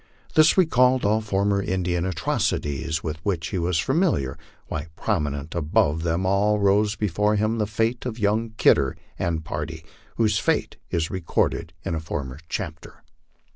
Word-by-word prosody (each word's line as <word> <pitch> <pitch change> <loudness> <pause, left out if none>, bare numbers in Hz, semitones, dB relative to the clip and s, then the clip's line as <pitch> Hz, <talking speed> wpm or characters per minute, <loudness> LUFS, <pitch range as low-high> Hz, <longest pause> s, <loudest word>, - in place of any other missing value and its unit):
This 155 +3 +5
recalled 130 - +4
all 110 +2 +3
former 100 -1 +1
Indian 90 -2 -1
atrocities 80 -2 -1
with 80 -1 -3
which 85 -5 -1
he 95 - -2
was 85 0 0
familiar, 130 - +1 0.3
while 80 0 -4
prominent 75 +1 -2
above 80 -1 +1
them 85 +2 0
all 100 +3 +3
rose 105 +1 +3
before 105 +1 +1
him 110 +2 0
the 105 - +1
fate 115 +4 -1
of 115 -2 -5
young 110 +1 +1
Kidder 65 -1 +4 0.2
and 80 -2 -1
party, 80 +2 -5 0.3
whose 110 -2 +2
fate - - 0
is 80 -1 -1
recorded 85 -2 -1
in - - -1
a 80 - -1
former 70 -4 -5
chapter. - - -6
95 Hz, 150 wpm, -24 LUFS, 80-105 Hz, 0.3 s, This